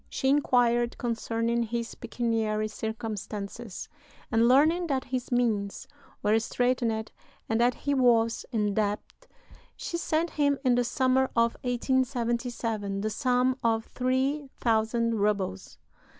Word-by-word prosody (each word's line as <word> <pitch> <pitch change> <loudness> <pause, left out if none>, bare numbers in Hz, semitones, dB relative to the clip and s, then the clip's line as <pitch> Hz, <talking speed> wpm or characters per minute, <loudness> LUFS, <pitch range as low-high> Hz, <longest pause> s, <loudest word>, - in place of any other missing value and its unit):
She 265 - 0
inquired 245 -4 +2
concerning 230 0 -1
his 235 0 -3
pecuniary 225 -2 -1
circumstances, 215 -1 -5 0.4
and, 230 0 +4
learning 315 +7 +4
that 270 -4 0
his 255 -1 -4
means 220 -5 0 0.4
were 210 +2 +4
straitened 230 -2 0 0.4
and 225 +1 +1
that 245 +1 +3
he 285 - -2
was 235 -4 +3
in 210 -4 0
debt, 210 - -3 0.5
she 340 - -4
sent 330 0 0
him, 285 -2 +2
in 250 - +5
the 245 0 +3
summer 260 +2 +2
of 230 0 +3
1877, 240 -5 -1
the 215 +1 -1
sum 250 +3 +2
of 225 -1 +1
three 265 +3 0
thousand 230 0 +1
rubles. 200 - -1
235 Hz, 120 wpm, -28 LUFS, 220-255 Hz, 0.5 s, in